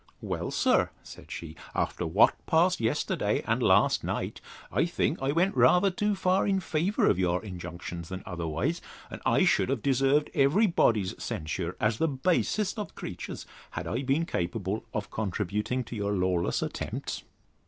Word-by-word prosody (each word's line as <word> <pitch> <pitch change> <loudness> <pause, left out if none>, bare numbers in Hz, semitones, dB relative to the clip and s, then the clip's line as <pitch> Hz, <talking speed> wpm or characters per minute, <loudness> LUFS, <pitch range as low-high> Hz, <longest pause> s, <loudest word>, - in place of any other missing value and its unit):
Well, - - -3
sir, - - +2
said - - -12
she, 80 -1 -7 0.2
after 90 - -1
what 95 +8 +5
passed 175 +2 +3
yesterday, 115 -1 0
and - - +1
last - - +4
night, - - -3 0.3
I 125 - +2
think 170 -3 -1
I 135 +1 +1
went 175 +6 +2
rather 180 +11 +5
too 210 +3 0
far 185 +1 +2
in 195 -1 +2
favour 180 +3 0
of 95 - +3
your 90 -1 +2
injunctions 85 -2 -7
than 95 0 -6
otherwise; 85 - -2 0.3
and - - -7
I - - +4
should - - +3
have 130 -5 -1
deserved 135 +2 +2
every 150 +10 +4
body's 110 - +2
censure, 85 +3 -3
as 105 +1 +1
the 165 - +3
basest 185 - 0
of 205 - -6
creatures, - - -6 0.2
had - - -5
I 120 - -2
been 140 +5 +1
capable 95 - -2
of 105 -2 -4
contributing 105 +4 -2
to 120 - -8
your 100 -1 -1
lawless 90 -2 +1
attempts. - - -4
120 Hz, 165 wpm, -28 LUFS, -, 0.3 s, what